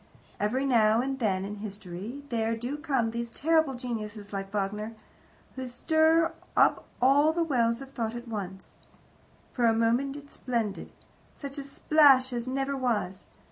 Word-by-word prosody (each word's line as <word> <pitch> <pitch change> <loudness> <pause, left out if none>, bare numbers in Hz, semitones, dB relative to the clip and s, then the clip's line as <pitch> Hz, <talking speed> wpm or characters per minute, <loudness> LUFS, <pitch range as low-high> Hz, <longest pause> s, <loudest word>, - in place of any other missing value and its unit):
Every 245 +7 0
now 225 -4 +4
and 265 +2 -2
then 195 -5 0
in 205 +1 -6
history 205 +5 -7
there 225 -1 0
do 245 +5 -4
come 270 -7 0
these 235 0 -4
terrible 315 +1 +2
geniuses, 215 -4 -6
like 195 0 -4
Wagner, 210 +2 -3 0.6
who 260 -1 -5
stir 320 +5 +3 0.2
up - - +4
all 280 +5 +5
the 335 +1 0
wells 235 -5 +1
of 270 0 -10
thought 230 -3 -3
at 240 0 -7
once. 195 -4 -6 0.8
For 245 - +1
a 225 - +4
moment 240 +5 +1
it's 285 0 -11
splendid. 230 -5 -3 0.4
Such 280 0 -5
a - - -3
splash 275 -2 +4
as 240 0 -3
never 270 +1 -1
was. 215 -8 -1
240 Hz, 155 wpm, -28 LUFS, 215-275 Hz, 0.8 s, all